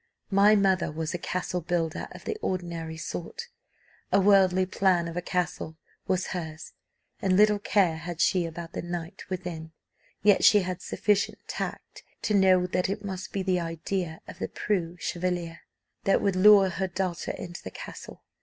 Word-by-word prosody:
My 200 +2 +6
mother 190 -5 +2
was 160 0 -3
a 175 - -3
castle 180 0 -2
builder 165 -1 -2
of - - -12
the 440 - -2
ordinary 170 -3 -3
sort: 175 - -6 0.6
a 195 - +5
worldly 190 -2 +5
plan 185 -2 +2
of 165 - -6
a 180 - -1
castle 175 -3 -2 0.3
was 185 -1 +1
hers, 160 -3 -6 0.5
and 185 -1 +2
little 210 0 +5
care 190 -5 +2
had 175 0 -6
she 175 0 +2
about 165 +1 -8
the - - -3
knight 175 -1 -6
within; 170 -4 -5 0.5
yet 205 -1 +5
she 210 -2 +7
had 180 -1 -4
sufficient 205 +2 0
tact - - -5 0.2
to 215 - 0
know 190 -2 +5
that 180 +1 0
it 205 +1 -3
must 190 -1 -5
be 195 - -2
the 185 -1 +1
idea 165 0 -3
of - - -10
the - - -2
preux 180 -4 -2
chevalier 175 0 -3 0.5
that 195 - +4
would 195 -2 +1
lure 195 0 +7
her 190 +1 -2
daughter 180 -1 -3
into 175 0 -7
the - - -7
castle. - - -10
180 Hz, 170 wpm, -27 LUFS, 170-195 Hz, 0.6 s, she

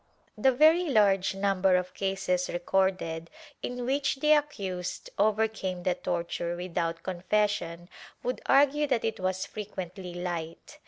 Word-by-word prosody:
^ - - -10
The 265 - +7
very 315 +7 +5
large 195 -6 +3
number 195 -1 +2
of 180 0 -1
cases 190 -2 -1
recorded 175 -2 0 0.3
in 245 0 -4
which 275 +2 +1
the 300 +3 +2
accused 195 - -2
overcame 205 -4 +1
the 180 - +2
torture 170 0 -3
without 170 -2 -3
confession 185 -2 -1 0.4
would 250 - -2
argue 290 +2 +4
that 250 -5 +1
it 225 -2 -2
was 185 0 -1
frequently 190 -3 -7
light. 170 -2 -5
190 Hz, 130 wpm, -28 LUFS, 180-225 Hz, 0.4 s, The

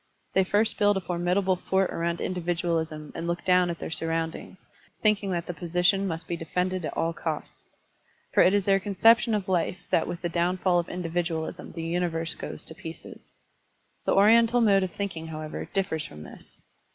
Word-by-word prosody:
They 190 - +4
first 205 +4 +1
build 205 -1 +4
a - - +1
formidable 180 +2 0
fort 190 +1 0
around 170 0 -2
individualism 165 -3 -2
and 165 +1 -5
look 170 0 -3
down 180 -1 +4
at 170 - -3
their - - -6
surroundings, 165 +2 -2 0.5
thinking 210 -2 +2
that 175 -2 -2
the 175 - -4
position 180 +4 +1
must 165 -2 -4
be 170 - -2
defended 180 +2 -2
at - - -5
all 165 +1 0
costs. 160 -2 -5 0.7
For - - +5
it 190 - +5
is 200 -2 +1
their 195 -1 +4
conception 220 +3 +4
of 200 -3 -2
life 180 -1 0
that - - +2
with 175 0 -6
the - - +1
downfall 175 +1 +1
of 170 - -4
individualism 170 -1 -3
the 165 - -5
universe 165 -1 -1
goes - - -7
to - - -10
pieces. 160 +1 -10 0.7
The - - +2
Oriental 230 +4 +5
mode 200 -4 +4
of 185 - -1
thinking, 170 -4 -5
however, 155 -1 -5
differs 190 -6 -1
from 75 0 -11
this. - - -14
175 Hz, 180 wpm, -27 LUFS, 165-195 Hz, 0.7 s, For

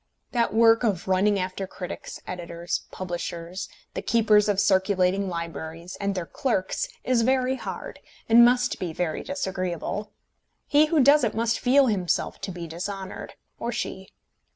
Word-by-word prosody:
That 235 -2 +1
work 225 +1 +5
of 195 -7 0
running 195 +2 +3
after 185 +1 -3
critics, 180 -1 -7
editors, 170 -1 -4
publishers, 175 0 -5 0.2
the - - -3
keepers 210 0 +3
of 200 -2 +2
circulating 190 0 +2
libraries, 170 +1 -6
and 200 0 -1
their 180 -2 -2
clerks, 195 -2 -1 0.2
is 250 -2 +2
very 260 +2 +2
hard, - - -7 0.3
and 230 +1 +8
must 245 0 +3
be 175 -3 -3
very 160 -1 -2
disagreeable. 195 - -3 0.5
He 295 +2 +4
who 305 -3 +3
does 285 +2 +6
it 220 -3 0
must 230 0 +1
feel 270 +2 +5
himself 195 -7 -1
to 195 - -4
be 175 -1 -6
dishonoured, 190 +4 -6 0.2
or - - -2
she. - - -4
195 Hz, 150 wpm, -25 LUFS, 180-230 Hz, 0.5 s, and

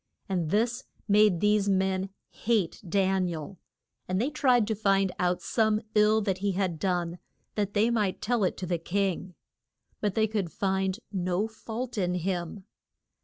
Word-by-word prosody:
And 180 -5 -1
this 235 +6 0 0.2
made 210 -4 +4
these 210 -1 +3
men 190 0 +1 0.2
hate 215 -7 0
Dan 190 0 +2
i 175 - -3
el, 160 +4 -7 0.5
and 185 +1 0
they 260 +7 0
tried 255 -6 +3
to 220 - -1
find 195 -2 +2
out 180 0 0
some 220 -2 +2
ill 215 +1 +4
that 195 -3 -1
he 200 0 0
had 180 -4 -1
done 175 -2 -1 0.3
that 205 -1 -2
they 220 +3 +3
might 210 -5 0
tell 235 -1 0
it 185 - 0
to 185 - -4
the 175 -1 -1
king. 185 0 -2 0.6
But 205 -3 -1
they 220 - +3
could 205 -6 -2
find 190 -1 0
no 185 +1 0
fault 225 +1 -5
in 180 -1 0
him. 180 +1 -3
195 Hz, 170 wpm, -28 LUFS, 185-215 Hz, 0.6 s, made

